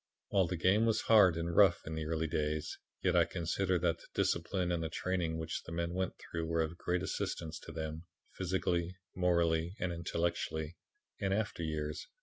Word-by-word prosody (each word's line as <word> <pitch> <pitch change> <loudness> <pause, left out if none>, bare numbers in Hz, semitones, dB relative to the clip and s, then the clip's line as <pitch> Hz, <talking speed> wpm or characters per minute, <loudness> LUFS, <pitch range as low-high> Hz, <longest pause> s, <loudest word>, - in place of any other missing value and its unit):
"While 95 -3 +3
the 90 +1 -2
game 100 +7 +4
was 110 - +2
hard 100 -7 +6
and 85 0 -2
rough 95 -3 +5
in 80 - -4
the 80 -1 -3
early 80 0 0
days, 75 -1 -1 0.3
yet - - +3
I - - +7
consider 90 +2 0
that 85 -1 +1
the - - -16
discipline 90 +1 +1
and 85 -1 0
the 80 - -2
training 85 -1 -1
which 80 +1 -3
the - - -10
men 85 +1 -2
went 95 0 -1
through 80 0 -4
were 80 0 +2
of 80 +1 -4
great 90 0 0
assistance 80 -2 -3
to - - -10
them, 80 +1 -5 0.3
physically, 90 -1 -1 0.2
morally 85 -1 +2
and 90 -1 -1
intellectually, 85 -1 -2 0.4
in 95 -2 0
after 105 -3 -1
years. 75 -2 -3
85 Hz, 185 wpm, -34 LUFS, 80-90 Hz, 0.4 s, I